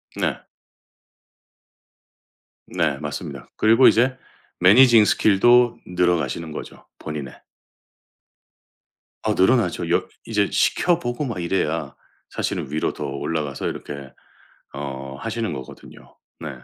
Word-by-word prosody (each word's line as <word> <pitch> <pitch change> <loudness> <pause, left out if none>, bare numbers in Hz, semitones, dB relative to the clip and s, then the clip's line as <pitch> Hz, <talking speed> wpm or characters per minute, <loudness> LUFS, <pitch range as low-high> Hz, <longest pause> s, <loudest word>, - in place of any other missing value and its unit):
네. - - -2 2.3
네 - - -1
맞습니다. - - -7
그리고 115 +4 +5
이제 130 +3 +3 0.4
매니징 115 +4 +7
스킬도 120 +5 +4
늘어가시는 85 -2 0
거죠, 75 - -9
본인의. 75 -4 -7 1.8
어 - - +1
늘어나죠. 95 -5 +2
여 95 +2 +1 0.2
이제 105 -3 0
시켜 175 -1 +2
보고 120 0 -3
막 115 -8 -4
이래야 80 -5 -2 0.3
사실은 - - -3
위로 75 - -1
더 75 - -6
올라가서 70 +1 -3
이렇게 70 -2 -7 0.6
어 70 -1 -6
하시는 115 -3 -3
거거든요. 65 -3 -11 0.2
네. 80 - -5
90 Hz, 235 characters per minute, -22 LUFS, 75-115 Hz, 2.3 s, 매니징